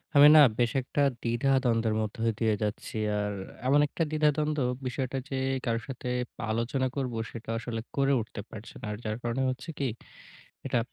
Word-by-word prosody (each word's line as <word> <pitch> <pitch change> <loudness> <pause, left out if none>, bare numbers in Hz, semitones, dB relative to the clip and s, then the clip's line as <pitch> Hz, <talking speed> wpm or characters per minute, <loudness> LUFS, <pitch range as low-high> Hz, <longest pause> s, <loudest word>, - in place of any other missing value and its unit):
আমি 145 +1 +10
না - - +10 0.2
বেশ 120 -1 +3
একটা 135 +3 -2 0.2
দ্বিধাদ্বন্দ্বের 120 -2 +2
মধ্যে 110 +2 -1
দিয়ে 110 -2 +2
যাচ্ছি। 105 +1 -4 0.2
আর 105 0 -1 0.3
এমন 140 +2 +5
একটা 165 - -1
দ্বিধাদ্বন্দ্ব 150 0 +2 0.3
বিষয়টা, 130 +1 -2
যে 135 - -2 0.3
কারো 115 -2 +1
সাথে 125 -2 -6 0.4
আলোচনা 120 +4 0
করব, 130 -3 -2 0.2
সেটাও 115 0 -5
আসলে 115 -1 -4 0.2
করে 140 0 +3
উঠতে 105 -1 -7
পারছি 110 +1 -10
না। - - -5
আর 105 - -4
যার 110 0 -2
কারণে 120 +2 -1
হচ্ছে 125 +3 -5
কি, 140 - +1 0.8
এটা 120 - +1
125 Hz, 165 wpm, -29 LUFS, 115-135 Hz, 0.8 s, আমি